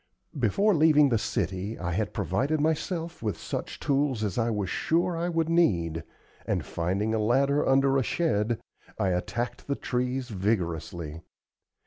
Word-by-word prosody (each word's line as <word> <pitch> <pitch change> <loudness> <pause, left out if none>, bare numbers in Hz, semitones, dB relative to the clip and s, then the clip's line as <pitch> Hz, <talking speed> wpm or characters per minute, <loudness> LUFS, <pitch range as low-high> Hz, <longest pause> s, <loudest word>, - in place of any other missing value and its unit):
Before 210 +1 +3
leaving 150 -3 +5
the 115 -3 +2
city 100 +2 -2
I 90 -1 -3
had 100 +4 -1
provided 150 +4 0
myself 165 +2 -1
with 105 -3 -2
such - - -5
tools 140 -5 +1
as 100 -4 -1
I 115 -1 +1
was 105 -4 -1
sure 170 - +1
I 170 +2 -1
should 165 -1 +1
need; 85 - +2 0.4
and - - 0
finding 95 +6 -1
a 110 - +1
ladder 135 +6 +3
under 135 0 +4
a - - +1
shed, 115 -8 0 0.4
I 100 -3 +1
attacked 120 +7 -2
the 140 - 0
trees 125 0 -2
vigorously. 85 -6 -2
120 Hz, 150 wpm, -27 LUFS, 100-150 Hz, 0.4 s, leaving